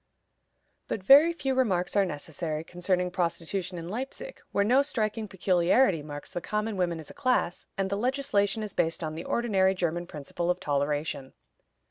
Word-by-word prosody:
But 195 - -3
very 285 - +8
few 270 -6 -2
remarks 195 -10 +1
are 200 -1 +4
necessary 155 0 -4
concerning 180 +1 -1
prostitution 175 +1 -2
in 165 0 -6
Leipzig, 265 - -6
where 200 - +2
no 250 +6 +5
striking 220 -5 -2
peculiarity 185 - +3
marks 145 -1 -8
the 175 - -3
common 210 +3 -2
women 175 -3 0
as 155 - -10
a - - -12
class, 250 -10 0
and 195 0 0
the - - +1
legislation 220 -4 0
is 210 - -5
based 165 +1 0
on 155 -1 -3
the 165 +2 -6
ordinary 195 -5 +2
German 175 -1 -1
principle 170 +2 -4
of 180 0 +1
toleration. 145 -3 -1
185 Hz, 165 wpm, -28 LUFS, 170-215 Hz, -, very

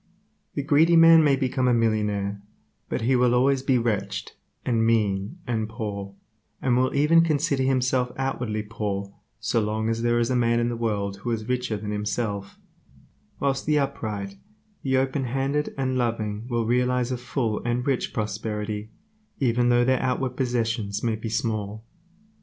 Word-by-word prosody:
The 140 - -1
greedy 155 +4 +4
man 165 -1 +8
may 145 -2 +4
become 130 -1 0
a 125 - +4
millionaire, 105 -3 0 0.5
but - - -2
he 125 +4 +2
will 125 -1 +3
always 135 +2 +3
be 130 -1 +2
wretched, 115 -4 -2 0.3
and 115 -3 +2
mean, 105 - +1
and 110 -3 -2
poor, 100 -3 -5 0.4
and 125 -2 +1
will 130 +2 +1
even 150 +4 +5
consider 150 -3 +1
himself 130 -1 +1
outwardly 125 -5 -2
poor 100 -2 -4 0.3
so 110 +2 0
long 110 +1 -1
as 115 0 -1
there 120 0 +2
is 120 +1 +1
a - - +2
man 120 -1 +2
in 120 0 +1
the 120 - -2
world 100 -4 -2
who 100 +5 -5
is 110 -2 -2
richer 125 -3 -1
than 105 +1 -5
himself, 105 -1 -3 0.8
whilst 135 0 -1
the 150 -1 +3
upright, 105 -8 -3 0.4
the 130 -1 +1
open 135 +1 0
handed 135 +4 -1
and 130 -1 0
loving 110 -2 -2
will 120 -2 0
realize 125 +1 +1
a - - 0
full 120 -3 -2
and 120 +1 -1
rich 135 -3 0
prosperity, 105 0 -3 0.5
even 120 -2 +2
though 120 0 +4
their 130 0 +2
outward 130 0 0
possessions 115 -5 -1
may 115 -2 +1
be 110 +1 -5
small. 110 -1 -2
120 Hz, 165 wpm, -25 LUFS, 110-130 Hz, 0.8 s, man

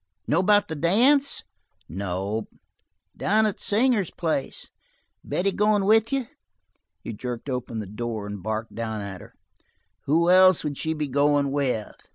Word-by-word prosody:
Know 160 - +2
about 205 +2 +3
the 160 - -5
dance?" 245 - +2 0.4
"Nope." 100 +5 -3 0.7
"Down 215 +2 +2
to 215 -2 +1
Singer's 215 -3 +1
place. 155 -5 -3 0.5
Betty 195 +2 0
goin' 210 0 +2
with 220 +2 +4
you?" 270 -2 0 0.8
He 115 - -5
jerked 125 +4 -5
open 125 -2 -4
the 110 - -4
door 110 +1 -5
and 105 -1 -6
barked 110 +2 -4
down 110 -2 -4
at 100 -2 -7
her: - - -15 0.7
"Who 170 +4 +3
else 185 -1 +6
would 145 -2 -4
she 160 0 -2
be 150 -1 -2
goin' 140 +1 +2
with?" 130 -7 -1
145 Hz, 150 wpm, -25 LUFS, -, 0.8 s, else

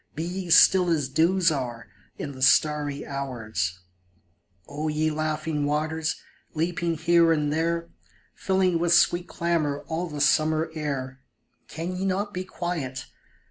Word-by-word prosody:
Be 160 - -3
ye 180 +1 -5
still 180 +2 +6
as 150 -5 0
dews 165 +4 +3
are 125 -5 -4 0.3
in 145 - -5
the 130 -1 -11
starry 145 0 +2
hours! 110 -10 -4 0.9
O 150 +2 -4
ye 155 +1 0
laughing 155 0 -2
waters, 155 +2 -1 0.4
leaping 165 +1 -1
here 170 +1 +4
and 150 -2 +1
there, 165 +1 -1 0.5
Filling 190 -3 +1
with 170 0 +2
sweet 175 +1 +3
clamor 160 -4 -1
all 170 +2 -2
the 150 -3 -7
summer 155 +3 +2
air, 135 -4 -4 0.5
Can 170 +3 -5
ye 185 - -3
not 200 +2 -1
be 185 - -3
quiet? 170 -8 -4
155 Hz, 140 wpm, -25 LUFS, 145-170 Hz, 0.9 s, still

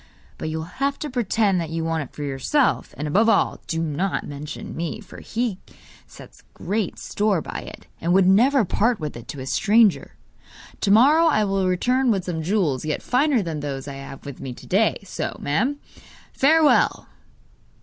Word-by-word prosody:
But 155 - -3
you 160 - -3
will 160 - -4 0.2
have 280 0 +1
to 300 - -5
pretend 215 -6 +1
that 165 - -5
you 165 0 -3
want 165 0 -1
it 140 - -8
for 150 - -7
yourself; 145 - 0
and, 150 +2 -3
above 210 +9 +3
all, - - +2
do 165 0 -1
not 170 +5 -1
mention 145 +1 -7
me, 170 +5 -4
for 210 - -12
he 225 -4 -2 0.5
sets - - -14
great 210 -2 -2
store 205 -3 0
by - - -6 0.2
it, - - -22 0.2
and 170 - 0
would 190 +1 +5
never 235 +6 +4
part 225 +5 +1
with 150 -2 -5
it 120 0 -10
to 140 - -7
a - - -6
stranger! 215 +7 +2 0.6
To 200 - 0
morrow 285 +11 +6
I 215 -9 +3
will 195 -2 0
return 250 +8 +1
with 195 -5 +1
some 165 -3 -3
jewels 165 -7 0
yet 155 -1 -3
finer 255 -2 +2
than 160 -3 -4
those 140 -2 -5
I 140 - -5
have 135 0 -10
with 140 -2 -8
me 130 -2 -6
to - - -13
day. 210 +4 +2
So, 195 - -5
madam, 230 - 0 0.6
farewell! 310 +2 +3
190 Hz, 190 wpm, -23 LUFS, 155-230 Hz, 0.6 s, morrow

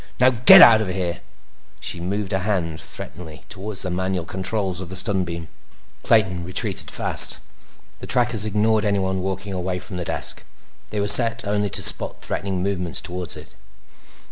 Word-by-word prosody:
_ - - -20 0.2
Now 130 +1 +4
get 120 0 +8
out 110 -2 +6
of 110 - -3
here!" 90 -2 -4 0.6
She 90 - -5
moved 95 +3 -4
a 95 - 0
hand 90 -6 -3
threateningly 80 -2 -9
toward 100 +1 -6
the 90 -1 +4
manual 95 -1 -3
controls 95 0 -4
of 90 - -9
the 95 - -7
stun 95 -1 -1
beam. 85 -1 -7 0.5
Clayton 95 -6 +1
retreated 95 +3 -2
fast. - - +5 0.6
The - - -10
trackers 120 -4 0
ignored 110 +1 0
anyone 95 -2 -1
walking 95 +1 -5
away 90 0 -4
from 90 0 -8
the 90 - -4
desk; - - 0 0.5
they 105 - -5
were 100 - -1
set 115 +2 +6
only 105 0 -2
to - - -2
spot - - +2
threatening 95 -2 -4
movements 90 -3 -1
toward 90 -1 -5
it. - - -14
95 Hz, 170 wpm, -21 LUFS, 90-105 Hz, 0.6 s, get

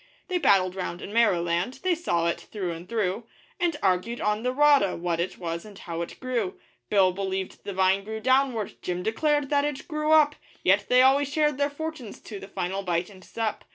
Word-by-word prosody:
They 365 -1 0
battled 185 - +4
round 180 -2 -4
in 205 - -7
Maoriland 180 +1 +1
they 370 -1 +3
saw 175 - 0
it 170 - -1
through 190 -5 -4
and 170 +2 -8
through 220 0 -1 0.3
And 345 -3 +1
argued 190 +5 +1
on 210 +1 0
the 250 +2 0
rata, 285 -7 +4
what 170 -1 -2
it 175 - -2
was 170 -1 -4
and 210 -2 -12
how 170 -3 -5
it 170 - -7
grew; 240 -7 -2 0.3
Bill 190 -3 +4
believed 190 0 -4
the 200 - -4
vine 190 +1 +2
grew 220 +2 -5
downward, 260 -3 +1
Jim 180 0 -3
declared 290 +6 +1
that 285 -1 +3
it 295 -2 -3
grew 305 -1 -1
up 305 -2 +6 0.3
Yet 200 +2 +3
they 250 +1 +6
always 275 +2 +4
shared 300 -2 +1
their 285 0 +2
fortunes 290 -6 -6
to 205 -3 -8
the 195 - -9
final 190 0 -3
bite 180 0 -1
and 185 -2 -15
sup. 220 +1 -3
210 Hz, 205 wpm, -26 LUFS, 185-275 Hz, 0.3 s, up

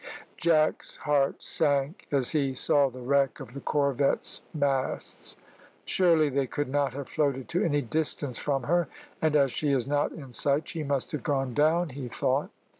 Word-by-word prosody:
Jack's 155 -2 +1
heart 145 -2 +1
sank 145 +3 0
as 135 -4 +2
he 140 -4 0
saw 140 +1 +3
the 125 0 -10
wreck 140 0 +2
of 120 - -9
the 140 - -6
corvette's 140 -1 +1
masts. 140 -4 -2 0.5
"Surely 165 -4 +3
they 140 -1 0
could 145 +2 -3
not 140 -2 0
have 140 -1 -6
floated 140 -4 -1
to 180 +4 0
any 145 -5 +1
distance 145 -1 -1
from 135 -3 -1
her, 170 +4 +1 0.3
and 155 -1 +2
as 140 -3 +4
she 145 +4 0
is 130 -3 +1
not 145 +1 0
in 140 -5 -10
sight 140 +5 0
she 165 - -5
must 140 -3 -1
have 150 - -3
gone 135 -4 -1
down," 160 +4 +2
he 135 -1 -6
thought. - - 0
140 Hz, 175 wpm, -28 LUFS, 135-155 Hz, 0.5 s, as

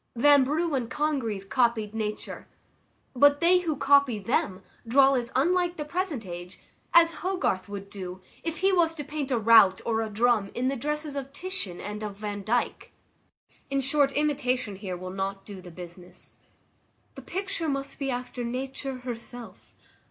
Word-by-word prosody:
Vanbrugh 290 +5 +4
and 250 -4 -1
Congreve 265 -10 -1
copied 230 -3 +1
nature; 215 -1 -4 0.7
but 285 +3 +6
they 355 +2 +5
who 330 -4 -1
copy 280 -4 +4
them 195 -3 -1 0.2
draw 270 +3 +6
as 240 -3 -1
unlike 350 +5 +2
the 300 - -3
present 320 - -2
age 175 0 -8 0.3
as 335 -1 +5
Hogarth 355 - -1
would 200 -1 -6
do 185 -2 -7 0.2
if 330 -1 -3
he 385 0 +4
was 330 -3 +3
to 295 - -5
paint 295 -1 -4
a 255 - +2
rout 220 -4 +6
or 225 -1 +1
a 220 - -2
drum 215 -1 +2
in 255 +2 +1
the 275 - -1
dresses 300 +3 -3
of 275 -1 -5
Titian 360 - -4
and 210 +1 -5
of 210 -2 -5
Vandyke. 210 +3 -2 0.8
In 275 0 +1
short, 275 +1 +2
imitation 255 -8 0
here 190 -3 -5
will 185 +1 -6
not 195 +1 -4
do 200 -3 -9
the 180 - -11
business. 175 +1 -10 0.8
The - - -10
picture 370 -4 -3
must 275 0 -4
be 275 -1 -1
after 250 0 -4
Nature 260 +2 -4
herself. 240 -1 -9
250 Hz, 160 wpm, -27 LUFS, 210-295 Hz, 0.8 s, but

